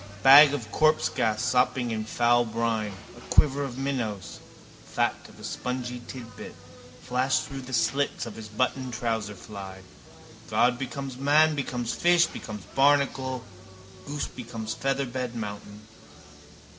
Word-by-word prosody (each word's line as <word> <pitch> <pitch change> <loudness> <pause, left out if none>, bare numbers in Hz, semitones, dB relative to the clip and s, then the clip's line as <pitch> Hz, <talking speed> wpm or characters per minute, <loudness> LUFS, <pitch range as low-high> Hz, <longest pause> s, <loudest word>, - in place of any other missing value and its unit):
Bag 140 +2 +10
of 120 -7 -4
corpsegas 135 -8 +2
sopping 125 -1 +1
in 110 -1 -2
foul 120 +2 +3
brine. 110 -2 -2 0.2
A 120 - -14
quiver 145 -1 +4
of 130 -3 -5
minnows, 120 -8 -3 0.4
fat - - 0 0.2
of - - -17
a - - -12
spongy 125 -1 -4
titbit, 115 -4 -9 0.5
flash 130 +1 +1
through 135 -1 -7
the 130 0 -10
slits 120 +5 0
of 115 - -7
his 110 -1 -8
buttoned 130 +3 -1
trouserfly. 105 -4 -4 0.7
God 125 0 +2
becomes 135 0 -5
man 150 +3 +4
becomes 125 -4 -3
fish 175 -1 +4
becomes 105 - -7
barnacle 135 -2 +2 0.6
goose 145 0 -3
becomes 115 -3 -6
featherbed 130 -2 -2
mountain. 105 -1 -7
125 Hz, 125 wpm, -27 LUFS, 110-135 Hz, 0.7 s, Bag